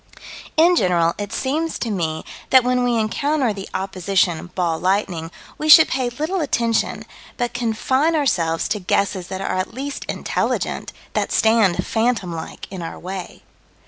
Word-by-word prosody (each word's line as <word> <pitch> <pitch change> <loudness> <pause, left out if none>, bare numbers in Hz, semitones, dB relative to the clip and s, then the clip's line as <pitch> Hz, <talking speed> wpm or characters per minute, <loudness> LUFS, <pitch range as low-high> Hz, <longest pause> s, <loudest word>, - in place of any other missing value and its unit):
In 345 +3 +6
general, 170 - +2
it 205 -1 -4
seems 310 +7 -1
to 230 - -3
me 160 -5 -2 0.2
that 260 -1 +6
when 250 0 +1
we 245 -1 +2
encounter 270 +2 0
the 195 -1 -8
opposition 185 -2 0
"ball 170 -3 0
lightning" 185 -3 0 0.3
we 310 - -1
should 320 +1 +10
pay 255 -2 0
little 315 +9 -2
attention, 235 -6 0 0.3
but 240 -1 -2
confine 255 +7 +1
ourselves 170 - +1
to 210 - -1
guesses 190 -1 0
that 190 0 -5
are 195 - -2
at 185 +4 -3
least 280 +2 -5
intelligent, - - -2 0.2
that - - -1
stand 220 -5 +3
phantom 225 -6 0
like 160 -1 -7
in 190 -2 -6
our 165 - -6
way. 185 0 -7
215 Hz, 155 wpm, -21 LUFS, 185-260 Hz, 0.3 s, should